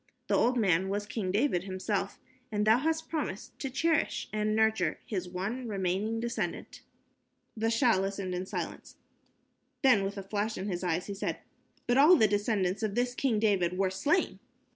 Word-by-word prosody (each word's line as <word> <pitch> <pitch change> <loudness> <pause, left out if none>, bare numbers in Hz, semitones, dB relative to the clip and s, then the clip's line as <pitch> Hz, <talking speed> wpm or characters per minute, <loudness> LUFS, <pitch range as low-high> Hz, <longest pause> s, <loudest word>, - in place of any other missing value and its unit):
The - - +3
old 250 +1 +3
man 190 -4 +2
was 205 +1 -2
King 205 -3 -3
David 200 -4 +1
himself, 190 +1 -2 0.3
and 210 -1 0
thou 220 +3 +5
hast 320 +2 -1
promised 295 - -4
to 270 - -3
cherish 315 +4 0
and 215 0 0
nurture 220 -7 +2
his 185 -4 -3
one 210 +8 -4
remaining 200 +2 -1
descendant." 225 -6 -4 0.7
The 225 0 0
Shah 230 -2 +3
listened 195 -1 -3
in 180 +1 -3
silence. - - -5 0.9
Then, 250 -7 +5
with 195 +1 -3
a 195 - -4
flash 210 +2 -2
in 190 - -4
his 180 -2 -3
eye 175 -1 0
he 200 - -6
said, 195 - -3 0.5
"But 245 +2 +3
all 310 +6 +8
the 220 - +5
descendants 205 -2 0
of 210 -2 -1
this 245 0 +1
King 250 -3 0
David 190 -5 +1
were 190 -1 +1
slain." 295 - 0
210 Hz, 175 wpm, -30 LUFS, 190-235 Hz, 0.9 s, all